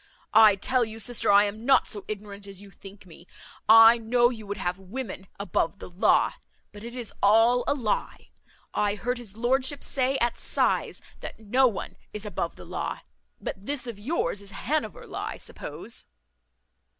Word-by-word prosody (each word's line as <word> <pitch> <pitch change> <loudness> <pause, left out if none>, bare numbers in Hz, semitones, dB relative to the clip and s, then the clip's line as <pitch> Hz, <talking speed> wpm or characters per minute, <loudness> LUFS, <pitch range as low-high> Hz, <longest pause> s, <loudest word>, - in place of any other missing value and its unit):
I 215 -2 +8
tell 250 +5 +1
you, 220 0 -6
sister, 230 -1 +2
I 200 0 +7
am 210 +2 -4
not 265 +1 +4
so 205 - -7
ignorant 205 -1 -7
as 195 -2 -9
you 200 0 -13
think 195 +1 -14
me 170 0 -15 0.4
I 225 +1 +9
know 240 +2 +3
you 220 -4 -9
would 205 +1 -4
have 180 -1 -2
women 195 -1 -6
above 180 -2 -1
the 180 - -10
law, 180 - +3 0.4
but 205 0 -12
it 235 +1 -8
is 240 -4 -6
all 225 +4 +5
a - - +2
lye; 230 -7 -3 0.4
I 205 0 +1
heard 245 +3 -2
his 215 -3 -10
lordship 260 +4 0
say 265 0 0
at 240 -2 0
size, - - 0 0.2
that - - -8
no 250 +5 +3
one 225 - -5 0.2
is 210 0 -6
above 210 - -3
the - - -12
law. - - -4 0.4
But 195 +1 -6
this 285 -2 -2
of 235 -4 -6
yours 205 - -2
is 200 - -8
Hanover 260 +1 -3
law, - - -5
I - - -5
suppose." - - -8
220 Hz, 180 wpm, -26 LUFS, 200-245 Hz, 0.4 s, I